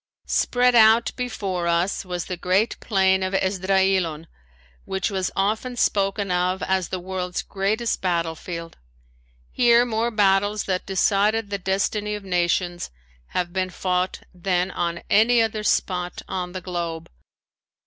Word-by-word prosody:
Spread 250 0 +2
out 225 0 +6
before 195 -8 -3
us 170 +3 0
was 180 -2 -4
the 180 - -4
great 185 +6 +1
Plain 190 -3 +2
of 185 +1 -1
Esdraelon, 190 -4 +1 0.6
which 190 +2 -2
was 190 -2 -1
often 220 +6 -1
spoken 200 -3 0
of 180 +1 0
as 190 -2 0
the 185 - -3
world's 180 0 -4
greatest 210 +4 -1
battlefield. 165 -1 -3 0.7
Here 240 0 +4
more 230 0 0
battles 205 -1 +2
that 185 -1 -2
decided 205 +3 +1
the 200 - -2
destiny 200 +3 -1
of 210 - -7
nations 175 -1 0 0.5
have 175 -1 -1
been 185 -1 -1
fought 180 0 -1
than 180 +1 -1
on 170 -1 -3
any 230 +3 +5
other 220 -1 0
spot 180 -4 -1
on 180 -1 -4
the 185 - -5
globe. 170 -3 -4
190 Hz, 135 wpm, -23 LUFS, 180-210 Hz, 0.7 s, out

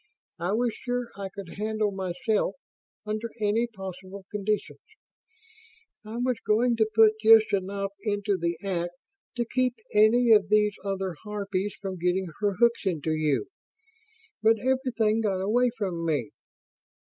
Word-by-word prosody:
I 175 +4 -1
was 235 +1 +1
sure 245 -1 -4
I 195 -1 -5
could 190 -2 -9
handle 215 -1 0
myself, 190 +2 -1 0.5
under 215 +2 -3
any 215 +3 +1
possible 190 -2 -9
conditions. 210 0 -2 1.2
I 220 +2 -7
was 250 -1 0
going 235 +3 +2
to 220 -1 +2
put 220 -1 +5
just 220 -1 +6
enough 195 +1 -1
into 205 -1 0
the 170 -2 -2
act 175 -3 -2 0.4
to 240 -1 -1
keep 255 +1 0 0.2
any 225 +3 +5
of 205 -3 +5
these 210 -1 +3
other 195 -3 -2
harpies 205 -2 -3
from 190 -2 -5
getting 180 +2 +1
her 205 -1 +1
hooks 235 0 +2
into 160 -3 -1
you. 155 - 0 0.9
But 225 +1 +4
everything 235 -3 +1
got 200 -4 0
away 235 +6 +2
from 185 -6 -2
me. 145 -9 -1
210 Hz, 140 wpm, -27 LUFS, 190-225 Hz, 1.2 s, just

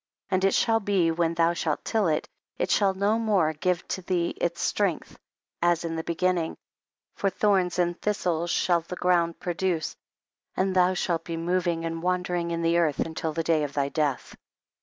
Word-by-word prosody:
32. - - +3
And 190 +1 +2
it 195 - +3
shall 225 -1 +3
be 195 -5 +2
when 165 0 0
thou 165 +1 +3
shalt 160 -3 -2
till 220 -5 +1
it, 155 -1 0 0.3
it - - -1
sliall 195 -2 +3
no 205 +4 +1
mare 195 -8 +2
give 180 +3 -1 0.2
thee 175 -2 +1
its 170 0 -1
strength 200 -5 -1 0.4
as 175 -1 +2
in 165 0 -3
the 160 - -3
beginning, 170 0 0 0.6
for 195 - 0
thorns 190 -3 +1
and 175 -1 0
thistles 175 -5 -1
shall 170 0 +2
the 170 +2 -7
ground 175 -2 +1
produce, 175 -3 -2 0.6
and 190 0 +1
thou 185 0 +4
sbalt 170 -2 -1
be 165 -1 -4
moving 170 -1 0
and 165 0 -3
wandering 180 -1 -1
in 170 0 -2
the 165 +1 +3
earth* 155 -4 +1
until 160 0 -2
the 165 +1 -2
day 160 -1 +2
of 145 -1 -4
thy 140 -1 0
death. 145 -4 -2
175 Hz, 185 wpm, -26 LUFS, 165-185 Hz, 0.6 s, thou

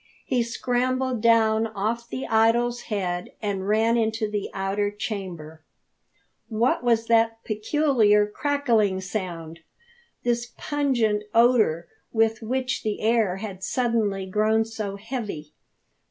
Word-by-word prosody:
He 250 -2 +1
scrambled 250 +1 -1
down 225 -1 +4
off 225 +3 -3
the 260 - -4
idols 235 +2 +2
head 180 -4 -2
and 200 -3 -3
ran 225 +3 +3
into 220 -1 0
the 210 -1 -3
outer 195 +1 -1
chamber. 190 -7 -6 0.9
What 230 +3 +1
was 230 -2 +2
that 225 0 +2
peculiar 215 -2 +2
crackling 225 -5 +1
sound 175 -5 -5 0.6
this 240 0 -1
pungent 240 -8 0
odour 225 -9 +4 0.2
with 225 0 +1
which 255 +3 -2
the 215 -1 -2
air 220 -4 +2
had 195 -2 -7
suddenly 220 -6 0
grown 215 +3 +2
so 215 -3 -5
heavy? 200 - -6
220 Hz, 115 wpm, -25 LUFS, 205-235 Hz, 0.9 s, down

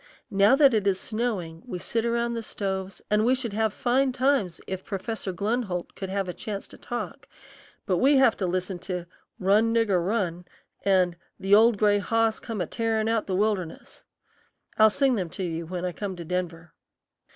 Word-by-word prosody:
Now 200 +6 +5
that 275 -2 +6
it 210 -2 +1
is 190 -1 +2
snowing, 205 -9 -3
we 230 -8 -5
sit 230 +5 -1
around 235 0 0
the 230 - -3
stoves, 195 -3 -4
and 210 0 +3
we 250 +3 +4
should 240 -5 -4
have 220 0 +1
fine 260 +5 +1
times 255 -8 +1
if 190 0 -5
Professor 200 0 -4
Glenholdt 200 -1 -2
could 190 - -6
have 195 0 -1
a 180 - -4
chance 200 +1 -5
to - - -13
talk; 240 0 -6 0.6
but 185 - +1
we 275 +5 +4
have 265 -4 +5
to 190 - -1
listen 185 +1 -2
to 180 -1 -4 0.3
"Run, 210 +4 +3
Nigger, 215 -6 +2
Run" 180 -3 -1 0.4
and 185 -3 +2 0.2
"The 195 +1 +1
Old 225 +1 +6
Gray 205 0 +3
Hoss 225 +2 +1
Come 225 -5 -5
A - - 0
tearin' 225 -1 -1
Out 225 -1 0
The 190 - -1
Wilderness." 195 -4 -2 0.7
I'll 220 0 +6
sing 270 +4 +2
them 185 -7 -2
to 190 - -5
you 165 -2 -3
when 180 +1 -4
I 180 - -1
come 195 +1 -5
to 170 -1 -8
Denver. 175 -1 -4
200 Hz, 190 wpm, -26 LUFS, 185-230 Hz, 0.7 s, that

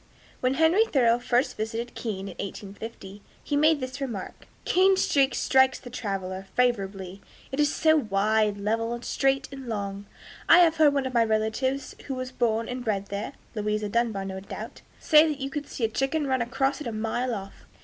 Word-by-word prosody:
When 255 +1 +1
Henry 325 +9 +4
Thoreau 240 - +3
first 245 +1 +1
visited 225 +2 -4
Keene, 200 -4 -4
in - - -6
1850, 200 0 -8 0.2
he 290 - -2
made 305 +1 +4
this 255 +1 -6
remark: 230 -8 -6 0.2
"Keene 380 +1 +4
Street 275 -7 +2
strikes 265 0 +3
the 245 - -11
traveler 195 -4 -4
favorably; 195 -6 -1 0.3
it 270 - -4
is 295 -1 +3
so 315 0 +3
wide, 215 -3 +1
level, 225 +3 -1
straight, 270 0 +1
and 270 -2 -8
long. 200 -2 -4 0.4
I 335 - +9
have 335 -2 +5
heard 300 -2 +5
one 275 -1 +1
of 260 - -4
my 235 -1 +4
relatives 220 +5 -1
who 270 - -3
was 255 0 -5
born 230 -2 0
and 250 0 -5
bred 200 -4 -2
there 200 +2 -4 0.2
[Louisa 210 -1 -1
Dunbar, 220 -3 0
no 190 0 -5
doubt] 195 - -8 0.2
say 310 0 +6
that 300 -2 -3
you 270 0 -4
could 295 0 -4
see 240 - -6
a - - +4
chicken 270 +7 -1
run 260 -2 0
across 270 +5 -1
it 285 - -4
a - - -2
mile 225 +3 -2
off." 195 -1 -9
240 Hz, 190 wpm, -26 LUFS, 210-270 Hz, 0.4 s, I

